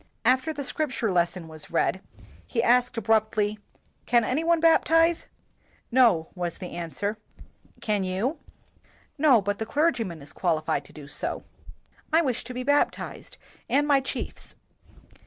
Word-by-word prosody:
After 260 +5 +3
the 290 -2 -5
Scripture 260 -6 -1
lesson 175 -1 0
was 155 -1 -11
read, 185 +2 0 0.5
he 230 -2 0
asked 245 0 +3
abruptly, 215 -1 +1 0.5
"Can 240 -1 +4
any 255 +8 0
one 335 0 +3
baptize?" 330 0 +4 0.6
"No," 230 -11 +4
was 175 -2 -4
the 180 - -7
answer. 185 +5 -3 0.6
"Can 210 -3 0
you?" 205 - -1 0.8
"No, 270 -8 +5
but 205 +1 -2
the 220 - -2
clergyman 230 - 0
is 145 - -7
qualified 155 -5 0
to - - -14
do 145 -2 -11
so." - - -4 0.7
"I 325 +2 +4
wish 255 -6 -1
to 250 - -7
be 250 - -3
baptized 285 +2 -1 0.3
and 290 +1 +2
my 285 -2 +5
chiefs." 265 - -5
Mr. - - -28
225 Hz, 145 wpm, -26 LUFS, 185-280 Hz, 0.8 s, No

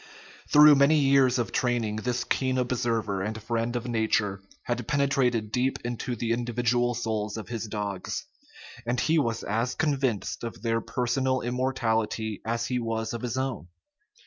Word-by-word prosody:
Through 150 0 +9
many 140 +3 +5
years 135 -3 +4
of 120 - -1
training 120 -4 0
this 125 +2 -1
keen 130 -1 0
observer 115 -5 0
and 110 +3 -3
friend 115 +2 -2
of 120 0 -3
nat 110 -2 +2
ure 100 -2 -3 0.2
had 120 -1 -3
penetrated 135 -6 +1
deep 130 +2 +1
into 120 +1 -3
the 115 0 -2
individual 120 +1 +1
souls 110 -2 -2
of 110 - -7
his 115 -2 -4
dogs, 100 -3 -4 0.6
and 120 +1 -1
he 160 +5 +3
was 115 -6 -1
as 115 +4 -1
convinced 135 -10 -1
of 115 -1 -6
their 115 -1 +1
personal 125 +3 0
immortality 115 -4 -1
as 115 +1 -1
he 125 0 -1
was 115 -1 -2
of 115 - -4
his 125 +1 -3
own. 130 -8 -3
120 Hz, 160 wpm, -27 LUFS, 110-125 Hz, 0.6 s, Through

